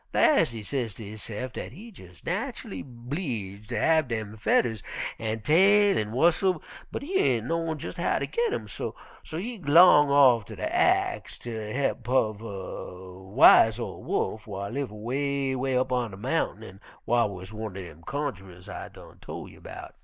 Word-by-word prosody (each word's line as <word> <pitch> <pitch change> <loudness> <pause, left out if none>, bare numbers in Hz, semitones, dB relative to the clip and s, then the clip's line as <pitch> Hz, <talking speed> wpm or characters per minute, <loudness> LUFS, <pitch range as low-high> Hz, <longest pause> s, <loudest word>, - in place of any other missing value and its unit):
Las' 280 - +5
he 115 -2 -7
say 125 +2 -1
ter 110 +1 -9
hisse'f 110 +3 -6
dat - - -6
he 220 - -11
jes' 90 - -14
natchully 95 - -4
'bleeged 120 - -5
ter 120 -3 -1
have 160 +3 +3
dem 110 -3 -4
fedders 110 0 +1 0.4
an' 110 0 -2
tail 195 - +5
an' 105 0 -1
whustle, 170 - +2 0.3
but - - -4
he 375 +7 -1
ain' 120 - +2
knowin' 165 0 -1
jes' - - -7
how - - +1
ter - - -1
git 470 -2 0
'em, - - -3
so - - -5 0.3
he 210 +8 -5
g'long 150 -2 +7
off 130 -6 +6
ter - - -10
ax 365 +3 +1
de 110 -3 -6
he'p 135 0 0
uv 110 -5 +1
a 95 -3 -7 0.2
wise 110 -1 +7
ol' 120 - -6
Wolf 110 0 -2
whar 100 -1 -5
live 135 -2 -3
'way, 135 +5 -1
'way 130 0 0
up 130 0 0
on 125 -2 0
de 95 - -10
mountain 120 -2 -1
an' 95 -3 -11 0.3
whar 120 -2 +3
wuz 95 +1 -9
one'r 110 -3 -5
dem 85 -3 -10
cunjerers 95 - -5
I - - -7
done - - -15
tol' - - -7
you - - -17
'bout. - - -9
120 Hz, 175 wpm, -27 LUFS, 105-150 Hz, 0.4 s, g'long